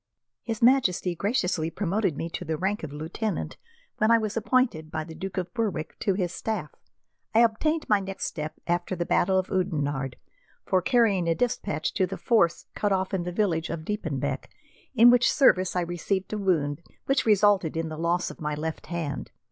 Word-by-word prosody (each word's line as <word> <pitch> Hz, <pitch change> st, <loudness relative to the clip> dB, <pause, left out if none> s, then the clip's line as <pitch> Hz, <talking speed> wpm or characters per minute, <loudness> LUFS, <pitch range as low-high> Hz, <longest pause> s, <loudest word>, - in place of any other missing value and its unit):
"His 225 Hz, -1 st, -4 dB
Majesty 230 Hz, -8 st, +3 dB
graciously 180 Hz, -4 st, 0 dB
promoted 190 Hz, -1 st, -1 dB
me 165 Hz, -, -3 dB
to -, -, -4 dB
the 160 Hz, -2 st, -2 dB
rank 195 Hz, +5 st, -1 dB
of 155 Hz, -, -6 dB
lieutenant 160 Hz, +8 st, -4 dB, 0.4 s
when 215 Hz, -, +3 dB
I 230 Hz, -, +7 dB
was 215 Hz, -2 st, -2 dB
appointed 230 Hz, -9 st, +1 dB
by 155 Hz, 0 st, -3 dB
the 160 Hz, +1 st, -10 dB
Duke 195 Hz, +3 st, -6 dB
of 180 Hz, -1 st, -3 dB
Berwick 205 Hz, -10 st, -3 dB
to 195 Hz, -, +1 dB
his 180 Hz, -2 st, -1 dB
staff. 220 Hz, -1 st, -3 dB, 0.6 s
I 230 Hz, -, +7 dB
obtained 305 Hz, +8 st, +1 dB
my 210 Hz, -1 st, +4 dB
next 195 Hz, 0 st, -4 dB
step 155 Hz, -1 st, -4 dB
after 175 Hz, +2 st, -1 dB
the 175 Hz, -1 st, -2 dB
battle 190 Hz, +2 st, +2 dB
of 185 Hz, 0 st, -1 dB
Oudenarde, 145 Hz, -8 st, -1 dB, 0.5 s
for 185 Hz, -1 st, +2 dB
carrying 205 Hz, -5 st, +3 dB
a 165 Hz, -, +2 dB
despatch 205 Hz, -8 st, -1 dB
to 190 Hz, -2 st, +1 dB
the 195 Hz, -, -5 dB
force 195 Hz, -8 st, +2 dB
cut 205 Hz, -, -1 dB
off 190 Hz, 0 st, 0 dB
in 180 Hz, -3 st, -1 dB
the 180 Hz, -, -3 dB
village 175 Hz, -4 st, 0 dB
of 160 Hz, -1 st, -5 dB
Diepenbeck, 160 Hz, -10 st, -3 dB, 0.5 s
in 240 Hz, +1 st, +8 dB
which 245 Hz, -1 st, +4 dB
service 185 Hz, -11 st, +4 dB
I 180 Hz, -, +2 dB
received 175 Hz, +3 st, -2 dB
a -, -, -1 dB
wound 160 Hz, -6 st, 0 dB, 0.2 s
which 270 Hz, -3 st, +1 dB
resulted 205 Hz, -6 st, +3 dB
in 165 Hz, 0 st, -2 dB
the 155 Hz, -, -5 dB
loss 170 Hz, +2 st, 0 dB
of -, -, -14 dB
my 150 Hz, -1 st, -2 dB
left 160 Hz, +1 st, -5 dB
hand. 165 Hz, -4 st, -4 dB
185 Hz, 190 wpm, -26 LUFS, 165-210 Hz, 0.6 s, in